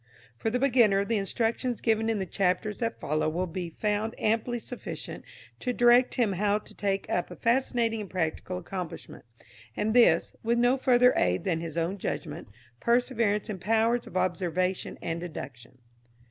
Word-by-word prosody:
For 225 - -2
the 240 - 0
beginner 235 -7 +4
the 225 0 0
instructions 230 +4 -1
given 225 -1 +1
in 225 - +1
the 190 - -2
chapters 190 +3 -1
that 230 -1 -2
follow 155 +1 0
will 175 +4 -1
be 175 0 -5
found 210 +5 -2
amply 225 +3 0
sufficient 245 +1 -7 0.4
to 250 - -2
direct 245 +1 +5
him 225 -5 +2
how 205 +2 +1
to 215 - -11
take 195 -1 -2
up 180 - -1
a - - -8
fascinating 235 -2 +1
and 200 - -7
practical 180 +1 -2
accomplishment, 180 -6 -7 0.5
and 215 +1 0
this, 230 -9 +4
with 235 +1 +1
no 245 +2 +4
further 250 -2 +4
aid 90 +1 +1
than 170 -4 0
his 165 -1 -6
own 170 +4 -1
judgment, 160 -2 -4 0.3
perseverance 235 -4 +1
and 195 -4 -5
powers 225 +3 +1
of - - -5
observation 180 +1 -1
and 165 0 -2
deduction. 130 -8 -8
210 Hz, 165 wpm, -28 LUFS, 180-235 Hz, 0.5 s, direct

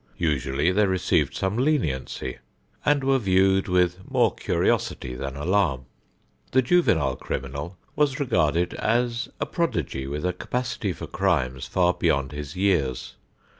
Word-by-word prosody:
Usually 75 0 +1
they 105 +2 +3
received 90 -6 +1
some 95 +3 -1
leniency, 80 - -1 0.4
and 145 -2 +2
were 135 0 +3
viewed 95 -2 +3
with 90 0 +2
more - - +3
curiosity 65 - -1
than 70 +1 -5
alarm. 75 -4 +1 0.7
The 130 0 +4
juvenile 90 - +3
criminal 70 +10 -5 0.2
was 145 -3 +1
regarded 85 - +1
as 120 +1 0
a - - 0
prodigy 80 - -2
with 75 +4 -3
a 90 - +1
capacity 120 +1 -3
for 85 - -6
crimes 65 0 0
far 90 -1 +2
beyond 70 -5 0
his 75 0 -7
years. 90 -9 0
90 Hz, 130 wpm, -25 LUFS, 70-110 Hz, 0.7 s, The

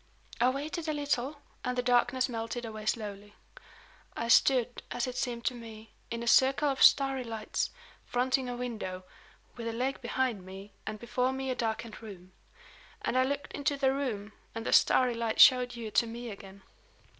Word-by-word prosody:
I 245 +2 +5
waited 310 +5 -4
a 310 - 0
little, 285 -1 -1 0.3
and 250 0 -2
the 250 - +1
darkness 250 +1 +3
melted 230 0 -4
away 215 -1 -7
slowly. 205 -2 -3 0.8
I 230 - -2
stood, 250 -1 +4
as 240 - -1
it 255 -1 -5
seemed 240 -2 -3
to - - +1
me, 225 -2 -11 0.2
in 235 0 -4
a - - -5
circle 270 +4 +4
of 270 - -2
starry 270 -2 +5
lights; 225 -2 -3 0.3
fronting 255 +1 0
a 245 - -3
window, 215 -7 -5 0.5
with 230 -1 -5
a 230 - -2
lake 260 +4 -2
behind 240 -4 -1
me, 190 +2 -10
and 215 0 -3
before 250 +3 0
me 265 0 -3
a - - -1
darkened 230 -1 -3
room. 185 -4 -11 0.7
And - - -1
I 255 - +5
looked 285 +2 -3
into 285 0 -1
the 265 -1 +2
room, 225 -7 -3 0.2
and 225 0 -5
the - - 0
starry 250 -2 +5
light 230 -1 -2
showed 250 -2 +7
you 225 -2 -6
to 235 - +3
me 235 +1 -6
again." 195 -1 -12
240 Hz, 180 wpm, -30 LUFS, 225-260 Hz, 0.8 s, showed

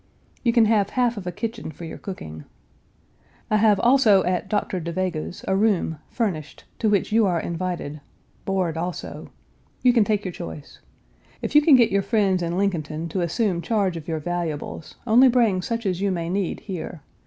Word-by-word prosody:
You 235 - +2
can 230 -1 +5
have 210 -2 +2
half 245 -2 +1
of 195 -4 -7
a - - -1
kitchen 225 +4 -5
for 160 +2 -9
your 160 - -8
cooking. 80 - -8 1.1
I 215 - +4
have 215 -1 +4
also 240 -6 +5
at 180 0 -1
Dr. 205 -3 -1
Da 170 0 -4
Vega's, 180 -1 -3
a 190 - +2
room, 195 -6 +1
furnished, 180 -11 -3 0.2
to 220 - +2
which 205 0 +1
you 220 -1 +4
are 175 -2 +1
invited 170 -4 -4 0.4
(board, 185 -4 -1
also). 175 +1 -5 0.5
You 250 -1 +6
can 230 -3 +5
take 210 -1 0
your 185 - -2
choice. 80 - -9 0.6
If - - -3
you 295 - +7
can 295 -2 +7
get 235 -3 +4
your 200 0 +2
friends 195 -3 +1
in 170 0 -2
Lincolnton 165 -4 -1
to 185 - -1
assume 175 +1 0
charge 200 -3 0
of 165 -2 -7
your 160 -2 -1
valuables, 165 -1 -4
only 245 +3 +6
bring 230 -7 +3
such 230 +3 -3
as 185 -1 -1
you 200 - +1
may 170 -3 -2
need 190 -1 -2
here. 175 -5 -6
190 Hz, 190 wpm, -23 LUFS, 170-220 Hz, 1.1 s, you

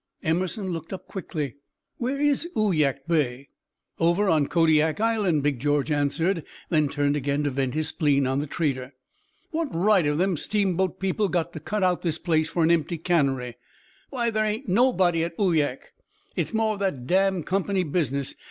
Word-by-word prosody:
Emerson 185 +5 -1
looked 165 -1 -6
up 190 -2 -7
quickly, 150 - -5 0.4
"Where 260 +3 -2
is 290 +3 +1
Uyak 155 -9 +1
Bay?" 140 -5 0 0.5
"Over 175 +5 +2
on 155 -4 +3
Kodiak 160 0 +3
Island," 210 -9 +1
Big 145 -4 0
George 145 +2 0
answered; 160 +4 0 0.3
then 155 -3 +2
turned 145 0 0
again 145 +1 -1
to 145 - 0
vent 135 0 -1
his 155 0 0
spleen 145 -4 +2
on 130 +1 0
the 150 - -3
trader. 135 -4 -2 0.6
"What 325 0 -1
right 195 +2 +4
have 145 0 +1
them 185 0 +1
steamboat 190 -2 0
people 195 +2 0
got 175 -1 -1
to 155 - -6
cut 205 +6 -2
out 180 -1 +2
this 165 -3 -1
place 160 -2 +1
for 165 0 0
an 160 - +4
empty 170 0 +1
cannery? 135 -8 0 0.5
Why, 240 -4 -1
there 215 0 +1
ain't 215 +1 -2
nobody 185 -6 +3
at 170 0 -5
Uyak. 155 -9 0 0.4
It's - - -1
more 220 -1 +1
of 205 - -7
that 165 -11 -2
damned 190 +1 +2
Company 195 0 0
business. 140 -4 -1
165 Hz, 175 wpm, -25 LUFS, 145-195 Hz, 0.6 s, right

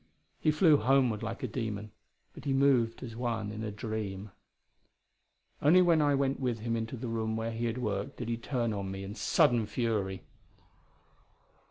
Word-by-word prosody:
He - - +2
flew 155 0 +5
homeward 125 -3 +2
like 115 +4 -5
a - - 0
demon, 110 -3 -4 0.4
but - - -12
he 140 - +1
moved 135 -4 +3
as 115 -3 -7
one 115 -3 -2
in 110 +1 -6
a 110 - -2
dream. 105 -2 -5 1.3
Only 175 +5 +6
when 170 -3 +4
I 145 -1 +3
went 135 0 0
with 125 -4 -1
him 115 0 -1
into 115 +2 -3
the 120 - -5
room 110 -1 -1
where 115 +1 -2
he 115 +1 -3
had 115 +1 -1
worked, 100 -5 -3
did 120 - -5
he 115 - 0
turn 120 -2 -1
on 100 -2 -3
me 95 0 -5
in 100 +1 -6
sudden 115 0 +3
fury. 105 -6 -1
115 Hz, 180 wpm, -30 LUFS, 110-130 Hz, 1.3 s, Only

